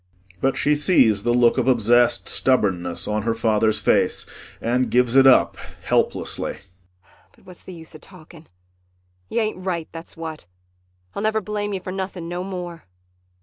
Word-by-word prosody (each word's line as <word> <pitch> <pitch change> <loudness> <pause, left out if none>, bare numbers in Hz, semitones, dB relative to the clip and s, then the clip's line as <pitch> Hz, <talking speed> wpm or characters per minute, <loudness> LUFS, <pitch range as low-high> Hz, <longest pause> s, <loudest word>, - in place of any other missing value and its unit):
[But 135 0 0
she 150 - +2
sees 145 - +4
the 120 - 0
look 120 +1 +3
of 130 - -1
obsessed 120 0 +3
stubbornness 95 -9 +1
on 105 0 -1
her 115 +1 -1
father's 110 -1 +1
face - - +1 0.3
and 125 +2 0
gives 125 0 +2
it 135 0 +7
up 130 - +4 0.3
helplessly.] - - -1 0.8
But - - -26
what's 180 -1 -13
the 185 - -10
use 160 -1 -9
of 155 - -13
talking. 165 -3 -14 0.8
You 235 - 0
ain't 215 -4 -3
right, 170 -4 -3
that's 165 0 -10
what. 160 - -7 0.7
I'll - - -5
never 215 +1 +1
blame 205 0 -4
you 190 - -4
for 185 - -6
nothing 190 -2 -5
no 175 +1 -4
more. 180 -3 -7
155 Hz, 160 wpm, -22 LUFS, 120-180 Hz, 0.8 s, it